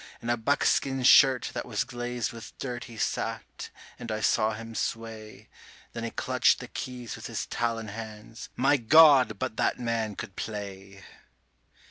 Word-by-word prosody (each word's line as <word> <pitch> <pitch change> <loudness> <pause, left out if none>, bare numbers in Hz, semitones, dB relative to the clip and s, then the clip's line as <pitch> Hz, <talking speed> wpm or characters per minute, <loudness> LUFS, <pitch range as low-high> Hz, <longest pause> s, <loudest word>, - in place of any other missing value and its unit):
In 120 - -2
a - - +3
buckskin 135 +2 +1
shirt 130 0 +6
that - - -3
was 105 -4 -1
glazed 120 -1 -4
with 115 -2 -11
dirt 125 -2 -5
he 115 - -12
sat, - - -3 0.3
and 115 - -6
I 110 - -2
saw 110 +1 +2
him 115 +1 -8
sway; 110 -1 -5 0.5
Then 115 - -5
he 115 - -2
clutched - - +2
the - - -8
keys 125 -4 -6
with - - -8
his - - -4
talon 115 -2 -2
hands 110 +1 -9
my 135 +3 +3
God! 135 -3 +6
but 110 - -4
that - - +1
man 115 -3 -2
could 95 - -8
play. 100 -2 -7
115 Hz, 160 wpm, -28 LUFS, 110-125 Hz, 0.5 s, shirt